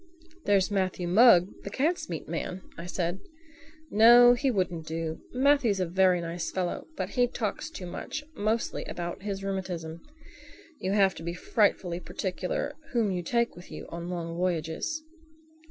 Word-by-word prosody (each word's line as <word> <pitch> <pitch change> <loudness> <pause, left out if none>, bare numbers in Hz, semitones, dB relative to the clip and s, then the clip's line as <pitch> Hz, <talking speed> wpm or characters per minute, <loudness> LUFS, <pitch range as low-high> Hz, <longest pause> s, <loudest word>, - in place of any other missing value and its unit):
"There's 200 0 +3
Matthew 185 -3 -1
Mugg, 190 -1 +5
the - - -5
cat's 300 - 0
meat 165 -3 -5
man," 180 +3 -4
I 170 - -7
said. 175 +1 -2 0.7
"No, 240 +3 +8
he 265 +3 +1
wouldn't 180 -7 -1
do. 160 0 -4
Matthew's 255 -6 +3
a 185 - +1
very 180 +1 +3
nice 170 0 -4
fellow, 180 -2 -3
but - - -2
he 245 -1 +2
talks 225 +3 -3
too 250 - -8
much—mostly 230 - -3
about 175 +1 -5
his 195 -1 -4
rheumatism. 180 -4 -4 0.8
You 190 +1 -1
have 195 -2 +4
to - - -10
be 170 +1 -4
frightfully 180 -3 +1
particular 185 +9 -3 0.2
whom 225 -5 +2
you 180 -1 -1
take 235 +7 0
with 175 +1 -12
you - - -7
on 170 +1 -6
long 170 -2 -4
voyages." 180 - -2
185 Hz, 155 wpm, -28 LUFS, 175-225 Hz, 0.8 s, No